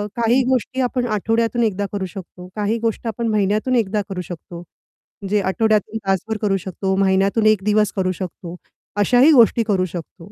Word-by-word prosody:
काही 240 +2 +2
गोष्टी 260 +1 0
आपण 250 0 -1
आठवड्यातून 225 +2 0
एकदा 205 -2 0
करू 200 -2 -2
शकतो, 180 0 -10
काही 210 +2 -1
गोष्टी 230 +1 -2
आपण 230 +2 -3
महिन्यातून 215 +4 +1
एकदा 210 -3 +1
करू 185 -2 -4
शकतो. 170 0 -9 0.6
म्हणजे 200 +1 0
आठवड्यातून 215 +2 +1
तासभर 195 +3 -1
करू 200 -3 +1
शकतो, 190 0 -3
महिन्यातून 195 +3 +2
1 215 -3 +3
दिवस 210 0 +2
करू 185 -2 0
शकतो 180 -1 -7 0.4
अशाही 245 +8 +5
गोष्टी 235 -4 +5
करू 195 -4 0
शकतो. 175 +1 -9
210 Hz, 165 wpm, -20 LUFS, 190-225 Hz, 0.6 s, अशाही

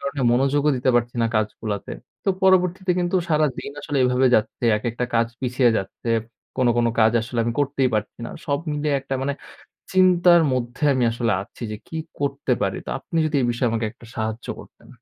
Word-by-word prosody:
কারণে 140 0 -3
মনোযোগও 140 +4 +2
দিতে 130 +1 +2
পারছি 120 0 +1
না - - +3
কাজ 110 0 +2 0.2
গুলাতে। 105 -2 -4 0.3
তো - - 0
পরবর্তীতে 185 0 +3
কিন্তু 175 +1 +1
সারাদিন 150 -4 0
আসলে 145 -2 -2
এভাবে 125 +1 +3
যাচ্ছে। 110 +2 0
একেকটা 120 +2 -2
কাজ 115 0 +3
পিছিয়ে 125 -1 +2
যাচ্ছে। 95 +4 -4 0.5
কোন, 130 - +2
কোন 120 0 +3
কাজ 110 +1 +5
আসলে 115 +2 -5
আমি 120 - -1
করতেই 135 -2 +1
পারছি 105 0 -3
না। - - -7 0.2
সব 140 0 +1
মিলিয়ে 150 0 0
একটা 135 0 -4
মানে 140 +1 -1 0.6
চিন্তার 180 -2 +5
মধ্যে 125 +2 -3
আমি 130 -2 +1
আসলে 115 -1 0
আছি 100 - -11
যে 105 - -5
কি 160 - -6 0.2
করতে 140 -2 0
পারি? 95 - 0
তো - - -7
আপনি 165 - -5
যদি 155 -1 -1
এ - - 0
বিষয়ে 120 +1 0
আমাকে 115 -1 -1 0.3
সাহায্য 110 +1 -3
করতেন। - - -16
130 Hz, 190 wpm, -23 LUFS, 115-145 Hz, 0.6 s, কাজ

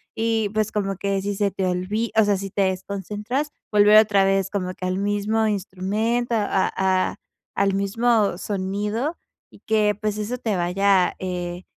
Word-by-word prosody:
y 225 -2 0
pues 215 -1 0
como 195 -2 -1
que 195 0 -1
si 205 +1 -1
se 200 0 +1
te 190 0 -2
olvi 185 +5 -1
o 220 - +6
sea, 205 -1 +2
si 195 0 -6
te 200 - +1
desconcentras, 205 - -3 0.2
volver 210 0 +6
otra 205 -3 +5
vez, 195 0 +1
como 185 -3 -2
que 185 - -6
al 185 0 -1
mismo 205 +2 0
instrumento, 210 +5 -1
a 205 -3 +1
a 190 -1 +1 0.4
al 195 0 +2
mismo 205 0 +1
sonido 205 - -2 0.3
y - - -17
que 210 -1 +2
pues, 210 -1 -2
eso 220 +4 -3
te 220 -4 -1
vaya, 185 +1 +2
eh, 180 -1 -4
200 Hz, 170 wpm, -23 LUFS, 190-215 Hz, 0.4 s, o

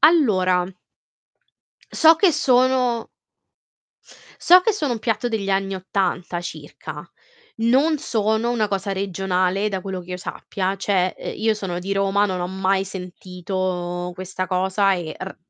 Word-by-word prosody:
Allora 190 - +4 1.2
so 325 0 +6
che 375 +2 +4
sono 250 -3 +2 1.3
so 360 +1 +7
che 445 - +2
sono 300 -11 -1
un 230 - -2
piatto 230 +2 -1
degli 205 -4 -2
anni 195 0 0
'80 185 -2 -2
circa, 175 - -8 0.5
non 270 +7 +3
sono 220 -4 0
una 230 -3 +1
cosa 195 0 -2
regionale, 190 +1 0
da 190 -2 -3
quello 190 -2 -4
che 180 +1 -12
io - - -3
sappia. 185 +1 -3
Cioè, 190 -2 0
uhm, - - -5
io 220 0 +2
sono 185 -4 -4
di 195 +2 -4
Roma, 195 +1 +2
non 185 -2 -3
ho 175 - -1
mai 190 0 0
sentito 180 -1 -4
questa 185 0 -4
cosa 190 +1 +2
e 170 -4 -5
r 190 +1 -7
195 Hz, 145 wpm, -22 LUFS, 185-225 Hz, 1.3 s, so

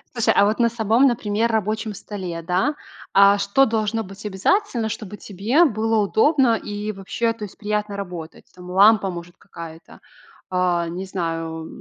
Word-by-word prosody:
Слушай, 235 - +3
а - - +6
вот 215 +1 0
на 235 -1 +4
самом, 230 +3 +2
например, 230 -2 0
рабочем 215 0 -1
столе, 185 -5 -6
да. 185 - 0 0.4
А 200 +1 +6
что 200 +7 +3
должно 220 -1 -1
быть 195 +3 -12
обязательно, 230 - 0
чтобы 210 -2 -6
тебе 215 - +1
было 225 -5 +1
удобно 235 +4 +3
и 210 0 -5
вообще, 210 +4 -2
то 225 -2 -8
есть 200 - -11
приятно 210 -1 -2
работать? 180 -5 -8
Там, 180 0 -11
лампа, 200 +1 +5
может, 175 0 -9
какая-то, 165 -1 -12 0.5
а, 180 -2 +1
не 180 +3 -5
знаю, 165 -3 -4
205 Hz, 160 wpm, -22 LUFS, 185-225 Hz, 0.5 s, а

